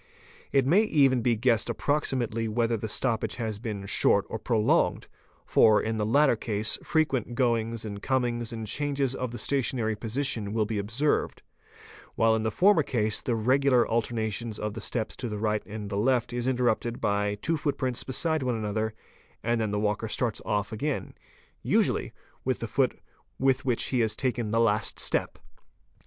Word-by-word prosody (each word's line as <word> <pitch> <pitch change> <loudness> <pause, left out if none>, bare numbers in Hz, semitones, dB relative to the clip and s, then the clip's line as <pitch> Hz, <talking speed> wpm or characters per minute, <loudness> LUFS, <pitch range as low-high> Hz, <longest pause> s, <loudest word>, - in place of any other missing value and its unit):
It 135 -2 +3
may 175 +10 +5
even 140 - +3
be 120 0 +2
guessed 115 -1 +1
approximately 125 -6 -1
whether 115 +1 +1
the 110 0 -4
stoppage 110 -1 -1
has 110 -3 -3
been 105 -4 -5
short - - +2
or - - -4
pro 115 - 0
longed, 105 - +2 0.4
for, 110 -1 +5
in 110 0 -2
the 105 - 0
latter 140 +2 +4
case 105 -1 -1
frequent 135 -7 0
goings 115 -3 0
and 100 -1 -6
comings 120 -3 -1
and 110 -1 -5
changes 140 +2 0
of 125 -2 -4
the 120 - -6
stationary 115 -2 0
position 110 -2 -1
will 110 -1 +1
be 105 0 -2
observed, 115 +9 -1 0.7
while 115 0 +3
in 110 - -1
the 110 - 0
former 190 - +4
case 110 -6 0
the 120 - -1
regular 130 +2 +3
alternations 115 -1 -1
of 105 -1 -3
the - - -6
steps 110 -3 -2
to 125 - -4
the 105 - -4
right 105 0 0
and 105 -1 -6
the 100 - -2
left 120 +1 +1
is 120 0 -2
interrupted 120 -2 0
by 100 0 0
two 165 +11 -1
footprints 140 -5 -1
beside 160 +4 0
one 125 -2 0
another 110 0 -2 0.5
and 115 0 +1
then 110 - 0
the 105 0 -1
walker 105 +1 -1
starts 115 0 -2
off 105 -1 -1
again, 140 +6 -3 0.5
usually - - +1 0.3
with - - 0
the - - -4
foot - - 0 0.4
with 135 +1 +1
which 125 -3 +1
he 130 - 0
has 110 -2 +1
taken 125 -4 -1
the 115 +2 +1
last 110 -2 +1
step. - - 0
115 Hz, 175 wpm, -27 LUFS, 110-130 Hz, 0.7 s, may